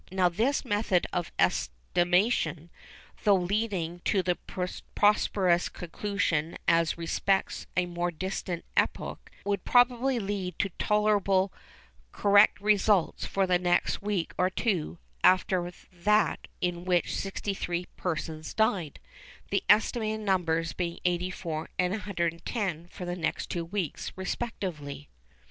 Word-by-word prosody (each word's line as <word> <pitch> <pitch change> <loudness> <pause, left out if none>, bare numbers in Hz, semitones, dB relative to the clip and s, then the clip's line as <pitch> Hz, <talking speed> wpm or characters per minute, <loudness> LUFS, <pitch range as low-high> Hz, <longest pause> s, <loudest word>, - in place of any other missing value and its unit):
Now 185 -1 +3
this 240 - 0
method 205 -5 +1
of 175 -1 -2
estimation, 175 - +1 0.5
though 205 -1 +6
leading 185 -2 -1
to 190 -2 +2
this 180 0 +1
preposterous 185 -1 +1
conclusion 170 -3 -2
as 165 -1 +3
respects 190 +3 0
a 180 - +3
more 175 0 -2
distant 175 0 -4
epoch, - - -1 0.2
would 200 -2 -1
probably 245 +1 +3
lead 195 -4 -3
to 195 - 0
tolerably 205 -2 +2 0.6
correct 205 0 +5
results 205 -2 +2
for 195 -1 +1
the 180 -1 +2
next 175 -1 +1
week 200 -4 -2
or 180 0 +3
two 185 -5 -1 0.3
after 185 -1 +3 0.2
that 210 +4 +2
in 175 -1 -1
which 180 -1 +1
63 190 -3 -3
persons 160 -2 -4
died,—the 190 -9 -2
estimated 220 0 +3
numbers 165 -5 +1
being 170 -1 -3
84 175 -2 -2
and 180 0 +2
110 175 -2 -2
for 180 - -8
the 175 0 -3
next 160 -3 -2
two 170 -1 -2
weeks 180 -3 -3
respectively. 175 - -4
185 Hz, 115 wpm, -28 LUFS, 170-205 Hz, 0.6 s, though